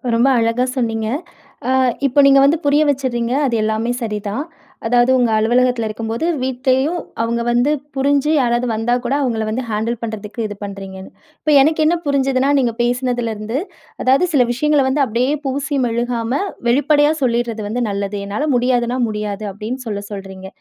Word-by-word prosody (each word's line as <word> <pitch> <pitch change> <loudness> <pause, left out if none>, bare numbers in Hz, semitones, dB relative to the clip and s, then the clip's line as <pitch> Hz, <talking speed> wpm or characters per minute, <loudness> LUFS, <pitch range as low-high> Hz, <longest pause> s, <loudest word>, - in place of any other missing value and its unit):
ரொம்ப 235 +3 +3
அழகா 230 +2 +1
சொன்னீங்க. 225 -3 -1 0.6
அ - - +2 0.4
இப்ப 275 +2 +1
நீங்க 275 0 +6
வந்து 295 +4 +3
புரிய 290 +1 +4
வச்சுட்றீங்க. 250 -4 -1
அது 245 -3 0
எல்லாமே 220 +2 0
சரிதான். 210 +3 -3 0.4
அதாவது 245 +1 +3
உங்க 245 -3 +2
அலுவலகத்தில 240 +1 +2
இருக்கும்போது, 225 +5 -3 0.2
வீட்டிலேயும் 265 +5 0 0.2
அவுங்க 235 +1 -1
வந்து 245 +4 +2 0.2
புரிஞ்சு 280 +2 +1
யாராவது 240 -1 +1
வந்தா 225 +2 0
கூட 245 - 0
அவுங்கள 235 -5 -1
வந்து 240 +4 -2
ஹேண்டில் 220 +2 -1
பண்ணுறதுக்கு 220 0 -5
இது 205 - -7
பண்ணுறீங்கன்னு. 195 -1 -8 0.3
இப்ப 305 - 0
எனக்கு 310 +3 +2
என்ன 330 +3 +3
புரிஞ்சுதுனா, 270 -1 +1
நீங்க 240 -3 +1
பேசினதில 245 -1 0
இருந்து, 215 +4 -4 0.5
அதாவது 265 +7 +4
சில 255 -4 +4
விஷயங்கள 295 +3 +2
வந்து 280 +2 +2
அப்பிடியே 245 +4 0
பூசி 280 +2 -2
மெழுகாம 235 0 -2 0.4
வெளிப்படையா 290 +3 +3
சொல்லிட்றது 235 -2 0
வந்து 240 +4 -2
நல்லது. 200 0 -3
என்னால 245 +10 -2
முடியாதுன்னா 245 0 +1
முடியாது. 210 -1 -4
அப்பிடின்னு 230 +6 -6
சொல்ல 205 -1 -3
சொல்றீங்க. 190 -1 -8
240 Hz, 155 wpm, -18 LUFS, 220-265 Hz, 0.6 s, நீங்க